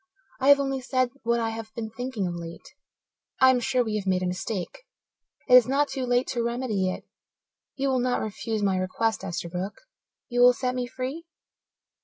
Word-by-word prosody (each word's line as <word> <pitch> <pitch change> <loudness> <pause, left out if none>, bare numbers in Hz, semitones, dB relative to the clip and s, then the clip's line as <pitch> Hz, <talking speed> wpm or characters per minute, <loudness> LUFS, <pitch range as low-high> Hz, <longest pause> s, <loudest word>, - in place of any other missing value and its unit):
I 270 +1 +3
have 285 0 +8
only 270 -1 -1
said 255 -1 0
what 235 0 +1
I 225 -1 0
have 225 -1 -7
been 220 -2 -5
thinking 245 -3 -3
of 175 - -2
late. 170 -1 -9 0.7
I 260 0 +7
am 255 - +2
sure 255 0 +1
we 215 -2 -2
have 200 -2 -5
made 185 -1 +1
a - - 0
mistake. 185 - -4 0.7
It - - +3
is 250 -3 +9
not 280 +2 +2
too 265 -2 -3
late 245 +1 +2
to 240 - -1
remedy 235 -5 -1
it. - - -5 0.7
You 275 0 0
will 260 -1 +2
not 245 0 +1
refuse 220 0 -3
my 195 -2 +2
request, 205 +4 -1
Esterbrook? 180 +1 -4 0.5
You 245 0 0
will 250 0 +8
set 250 0 -2
me 250 -1 -2
free?" 260 +6 -5
240 Hz, 195 wpm, -26 LUFS, 200-255 Hz, 0.7 s, is